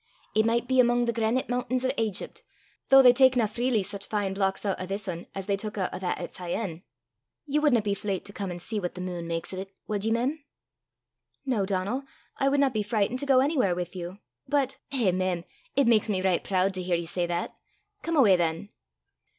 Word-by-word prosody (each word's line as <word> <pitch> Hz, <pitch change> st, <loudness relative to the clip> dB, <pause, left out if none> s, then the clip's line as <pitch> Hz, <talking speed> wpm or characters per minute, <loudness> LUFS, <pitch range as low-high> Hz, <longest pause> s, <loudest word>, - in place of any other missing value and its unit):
It 220 Hz, +1 st, +3 dB
micht 235 Hz, +1 st, +1 dB
be 260 Hz, 0 st, +2 dB
amo' 240 Hz, 0 st, +4 dB
the 235 Hz, -, 0 dB
grenite 230 Hz, +3 st, 0 dB
muntains 250 Hz, +1 st, -1 dB
o' -, -, +2 dB
Aigypt, 225 Hz, -, -2 dB, 0.5 s
though 270 Hz, 0 st, +8 dB
they 250 Hz, -1 st, +8 dB
takna 255 Hz, -3 st, +4 dB
freely 235 Hz, 0 st, 0 dB
sic 200 Hz, +1 st, -6 dB
fine 205 Hz, -3 st, -1 dB
blocks 195 Hz, +1 st, -1 dB
oot 195 Hz, -, +1 dB
o' -, -, -3 dB
this 195 Hz, +1 st, -4 dB
ane 170 Hz, -1 st, -5 dB
as 195 Hz, -1 st, -4 dB
they 200 Hz, 0 st, +1 dB
tuik 210 Hz, +1 st, -6 dB
oot 190 Hz, -2 st, -1 dB
o' -, -, -4 dB
that 185 Hz, -1 st, -2 dB
at -, -, -6 dB
Syene. 175 Hz, -1 st, -4 dB, 0.6 s
Ye 295 Hz, 0 st, +1 dB
wadna 270 Hz, -8 st, +3 dB
be 205 Hz, -1 st, 0 dB
fleyt 200 Hz, -2 st, -3 dB
to 200 Hz, -, -8 dB
come 200 Hz, -2 st, -4 dB
an' 175 Hz, -, -5 dB
see 210 Hz, +5 st, -3 dB
what 180 Hz, -3 st, -4 dB
the -, -, -7 dB
meen 175 Hz, -2 st, -4 dB
maks 165 Hz, +2 st, -3 dB
o' 190 Hz, 0 st, -3 dB
't, 195 Hz, -, -18 dB, 0.2 s
wad 205 Hz, -2 st, -1 dB
ye, 225 Hz, -, +1 dB
mem?" 265 Hz, +7 st, 0 dB, 1.0 s
"No, 225 Hz, -8 st, 0 dB
Donal. 200 Hz, +7 st, -1 dB, 0.3 s
I 275 Hz, -, +2 dB
would 280 Hz, +1 st, +2 dB
not 275 Hz, -2 st, +3 dB
be 215 Hz, -, 0 dB
frightened 215 Hz, +3 st, 0 dB
to 285 Hz, -, -3 dB
go 260 Hz, -2 st, +5 dB
anywhere 265 Hz, -, +2 dB
with 175 Hz, +1 st, -5 dB
you. 180 Hz, +1 st, -6 dB, 0.3 s
But 275 Hz, -1 st, 0 dB
" -, -, -47 dB
"Eh, 240 Hz, -9 st, +2 dB
mem! 185 Hz, -1 st, -1 dB, 0.3 s
it 280 Hz, 0 st, +4 dB
maks 225 Hz, -2 st, +3 dB
me 190 Hz, -3 st, 0 dB
richt 185 Hz, -2 st, +1 dB
prood 190 Hz, 0 st, +2 dB
to 185 Hz, -, -3 dB
hear 180 Hz, -1 st, 0 dB
ye 170 Hz, 0 st, -2 dB
say 175 Hz, +1 st, -1 dB
that. 175 Hz, 0 st, -2 dB, 0.5 s
Come 330 Hz, -1 st, -1 dB
awa 215 Hz, -9 st, +7 dB
than." 170 Hz, +2 st, -1 dB
205 Hz, 230 wpm, -27 LUFS, 185-250 Hz, 1.0 s, though